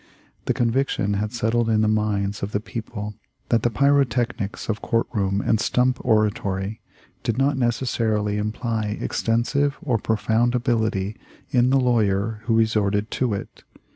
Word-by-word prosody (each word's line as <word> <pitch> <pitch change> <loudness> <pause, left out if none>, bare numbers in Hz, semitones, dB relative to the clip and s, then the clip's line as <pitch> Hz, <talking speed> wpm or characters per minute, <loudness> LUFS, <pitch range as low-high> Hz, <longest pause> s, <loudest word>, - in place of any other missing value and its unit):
The - - 0
conviction 115 -4 +1
had 105 +1 -1
settled 115 0 0
in 110 -1 +3
the 110 - +3
minds 105 -2 0
of 100 +2 -4
the 105 - +1
people 105 -1 -6 0.4
that 115 - +3
the 120 - +2
pyrotechnics 120 -4 +1
of 110 -1 -2
court 115 0 +1
room 100 -2 0
and 110 - +2
stump 125 +2 +1
oratory 105 -1 0 0.4
did 115 - -1
not 140 +2 +2
necessarily 115 -4 0
imply 110 0 -2
extensive 140 +5 0
or 130 -10 0
profound 110 +3 +1
ability 110 -4 0 0.3
in 125 0 +3
the 135 +1 +4
lawyer 110 -3 +1
who 115 -1 +2
resorted 105 -1 +1
to 120 -5 0
it. 100 - -8
110 Hz, 145 wpm, -23 LUFS, 105-120 Hz, 0.4 s, the